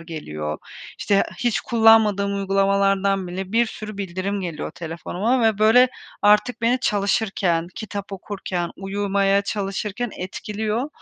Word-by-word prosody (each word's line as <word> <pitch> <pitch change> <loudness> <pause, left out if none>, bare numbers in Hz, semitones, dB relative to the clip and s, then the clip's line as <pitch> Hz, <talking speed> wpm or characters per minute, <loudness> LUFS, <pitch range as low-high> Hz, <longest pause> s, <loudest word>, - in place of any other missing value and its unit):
geliyor. 75 - -5 0.4
İşte 200 -1 +2 0.2
hiç 240 -3 0
kullanmadığım 220 -3 +4
uygulamalardan 195 0 +1
bile 190 +2 -5
bir 235 +1 +3
sürü 215 -2 -8
bildirim 195 +1 -3
geliyor 170 -5 -4
telefonuma. 175 - -2
Ve, 220 -2 +2
böyle, 230 +4 +6 0.3
artık 210 +4 +4
beni 245 +2 +2
çalışırken, 195 -5 +1
kitap 205 -3 -6
okurken, 185 -2 -4
uyumaya 195 0 +1
çalışırken 205 +3 -3
etkiliyor. 215 +6 -3
200 Hz, 115 wpm, -22 LUFS, 190-215 Hz, 0.4 s, böyle